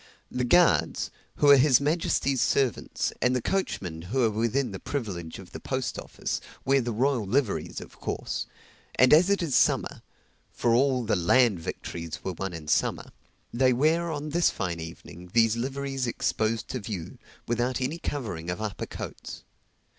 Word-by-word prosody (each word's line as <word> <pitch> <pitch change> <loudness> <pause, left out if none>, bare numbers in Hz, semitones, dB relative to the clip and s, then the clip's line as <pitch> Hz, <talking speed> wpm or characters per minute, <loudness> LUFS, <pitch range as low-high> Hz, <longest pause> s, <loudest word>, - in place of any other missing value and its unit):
The 125 0 -1
guards, 175 +8 +3 0.2
who 145 - +5
are 140 - +9
his 130 -2 +5
majesty's 140 -3 +1
servants, 135 -4 0
and 125 +1 +3
the - - +2
coachmen, 95 - -2
who 120 +10 0
are 115 - +3
within 115 +4 0
the 95 - -6
privilege 95 - -4
of - - -12
the - - -7
post - - -3
office, - - -4 0.2
wear 135 +1 +4
the 120 0 -2
royal 125 +1 +1
liveries 125 -1 0
of - - -12
course; - - -3 0.5
and 130 +1 +6
as 170 +5 +6
it 200 -3 +2
is 150 -6 -1
summer - - +2 0.5
(for 120 - +1
all 130 0 +3
the 110 -1 +1
land 105 +3 +4
victories 85 0 -6
were 95 - -3
won 95 +2 -4
in 80 -3 -8
summer,) - - 0 0.4
they 130 +1 +4
wear, 160 +6 +2
on 150 -1 -4
this 170 +3 +3
fine 85 -3 -3
evening, 85 +2 -9
these 115 -1 +4
liveries 135 +1 -2
exposed 110 -1 -1
to 130 - -3
view, 100 -6 -6 0.3
without 120 +2 0
any 135 +6 -2
covering 100 - -4
of 90 - -3
upper 110 -2 -4
coats. - - -8
125 Hz, 170 wpm, -27 LUFS, 100-140 Hz, 0.5 s, are